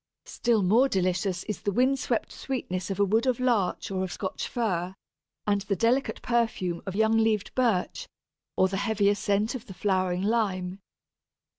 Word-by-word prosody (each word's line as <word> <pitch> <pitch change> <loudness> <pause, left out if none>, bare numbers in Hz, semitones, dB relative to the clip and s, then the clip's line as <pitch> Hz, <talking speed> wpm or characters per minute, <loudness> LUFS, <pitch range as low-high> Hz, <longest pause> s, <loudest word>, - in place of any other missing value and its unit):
Still 230 -4 +1
more 230 +9 +4
delicious 185 -2 0
is 210 - -5
the 205 - -1
wind 260 +6 +2
swept 240 -3 -1
sweetness 185 -9 -4
of 195 0 -3
a 200 - +5
wood 220 +6 +1
of 255 -2 +1
Larch 230 -8 0
or 190 -1 -1
of 185 - -4
Scotch 190 +4 -4
Fir, 190 -6 -2 0.5
and 205 -1 +1
the 200 0 -1
delicate 240 +8 +1
perfume 225 -8 0
of 190 - -4
young 220 +1 +3
leaved 220 -2 +1
Birch, 230 -8 0 0.5
or 185 - +5
the 195 +1 -3
heavier 205 0 +2
scent 205 +2 0
of 255 -2 -7
the 190 - -9
flowering 185 -1 0
Lime. 195 -4 0
205 Hz, 170 wpm, -27 LUFS, 185-230 Hz, 0.5 s, a